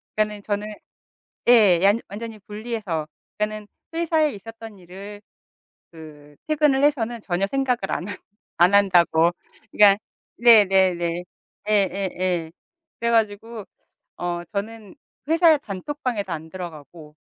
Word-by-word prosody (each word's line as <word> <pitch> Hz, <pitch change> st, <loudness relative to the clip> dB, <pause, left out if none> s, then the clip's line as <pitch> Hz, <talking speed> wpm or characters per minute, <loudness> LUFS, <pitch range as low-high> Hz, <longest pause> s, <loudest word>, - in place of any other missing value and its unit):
그러니까는 210 Hz, -1 st, -1 dB
저는 205 Hz, 0 st, -3 dB, 0.8 s
예. 205 Hz, -8 st, +6 dB
완 205 Hz, +3 st, +4 dB
완전히 220 Hz, +2 st, -7 dB
분리해서 210 Hz, -7 st, -4 dB, 0.3 s
그러니까는 210 Hz, 0 st, -3 dB, 0.3 s
회사에 320 Hz, -3 st, +1 dB
있었던 225 Hz, 0 st, -11 dB
일을 195 Hz, +3 st, -11 dB, 0.7 s
그 150 Hz, -3 st, -14 dB
퇴근을 300 Hz, -3 st, +2 dB
해서는 240 Hz, -5 st, 0 dB
전혀 190 Hz, +1 st, -1 dB
생각을 250 Hz, -4 st, -1 dB
안 180 Hz, -, -3 dB
하 205 Hz, -, -4 dB, 0.5 s
안 180 Hz, +3 st, +6 dB
한다고, 175 Hz, -4 st, +4 dB, 0.4 s
그러니까 200 Hz, -1 st, +6 dB, 0.4 s
네네네 190 Hz, -6 st, +4 dB, 0.5 s
예예예. 185 Hz, -4 st, 0 dB, 0.5 s
그래 235 Hz, -, 0 dB
가지고 225 Hz, 0 st, -1 dB, 0.5 s
어 175 Hz, -1 st, -3 dB
저는 210 Hz, -, -6 dB, 0.3 s
회사 325 Hz, -1 st, +5 dB
단톡방에도 220 Hz, -, -4 dB
안 160 Hz, 0 st, -7 dB
들어가고 160 Hz, -3 st, -10 dB
205 Hz, 265 characters per minute, -23 LUFS, 175-230 Hz, 0.8 s, 예